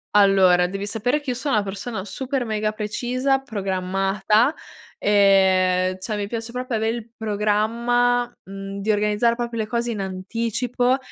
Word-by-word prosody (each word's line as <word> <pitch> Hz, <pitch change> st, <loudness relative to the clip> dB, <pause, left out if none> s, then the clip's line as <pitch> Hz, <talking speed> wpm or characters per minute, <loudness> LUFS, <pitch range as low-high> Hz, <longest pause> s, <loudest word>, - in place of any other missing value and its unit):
Allora 190 Hz, -3 st, +5 dB
devi 195 Hz, +2 st, -4 dB
sapere 245 Hz, +8 st, 0 dB
che 285 Hz, -, -6 dB
io 250 Hz, -, 0 dB
sono 275 Hz, -3 st, -1 dB
una 210 Hz, -, +2 dB
persona 200 Hz, +1 st, -5 dB
super 255 Hz, +6 st, -3 dB
mega 215 Hz, -1 st, -1 dB
precisa, 250 Hz, +5 st, -1 dB
programmata, 195 Hz, +1 st, 0 dB, 0.4 s
ehm, 185 Hz, -2 st, +3 dB
cioè 210 Hz, +2 st, -3 dB
mi 205 Hz, -, -3 dB
piace 230 Hz, +1 st, -5 dB
proprio 250 Hz, 0 st, -3 dB
avere 220 Hz, +2 st, 0 dB
il 235 Hz, 0 st, -9 dB
programma 230 Hz, +3 st, +1 dB
mhmm, 195 Hz, +1 st, -7 dB
di 215 Hz, -, +1 dB
organizzare 210 Hz, +3 st, +2 dB
proprio 235 Hz, -1 st, -3 dB
le 215 Hz, -, -3 dB
cose 235 Hz, +1 st, -1 dB
in 210 Hz, -3 st, -3 dB
anticipo 230 Hz, +6 st, -1 dB
215 Hz, 150 wpm, -22 LUFS, 195-240 Hz, 0.4 s, Allora